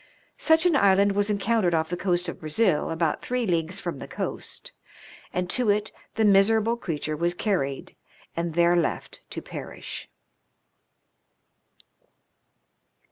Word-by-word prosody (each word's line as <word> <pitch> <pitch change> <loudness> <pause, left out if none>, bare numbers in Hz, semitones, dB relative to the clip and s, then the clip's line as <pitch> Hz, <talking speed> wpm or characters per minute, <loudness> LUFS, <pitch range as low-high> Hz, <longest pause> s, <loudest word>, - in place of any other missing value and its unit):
Such 320 +1 +4
an 350 -4 +4
island 200 -4 +5
was 205 +1 0
encountered 200 -3 +1
off 160 0 0
the - - 0
coast 180 -1 0
of 170 - -5
Brazil, 155 +2 +1
about 165 -1 0
three 250 -1 -1
leagues 170 0 0
from 170 -7 -4
the - - -7
coast, - - -5 0.6
and 180 0 -1
to 250 -4 +1
it 210 +1 +1 0.2
the 220 0 +2
miserable 215 +3 +4
creature 155 -8 -3
was 170 +3 0
carried 175 -10 -2 0.4
and 170 -1 -2
there 170 0 +4
left 170 -2 -1
to - - -6
perish. - - -7
185 Hz, 135 wpm, -26 LUFS, 170-215 Hz, 0.6 s, island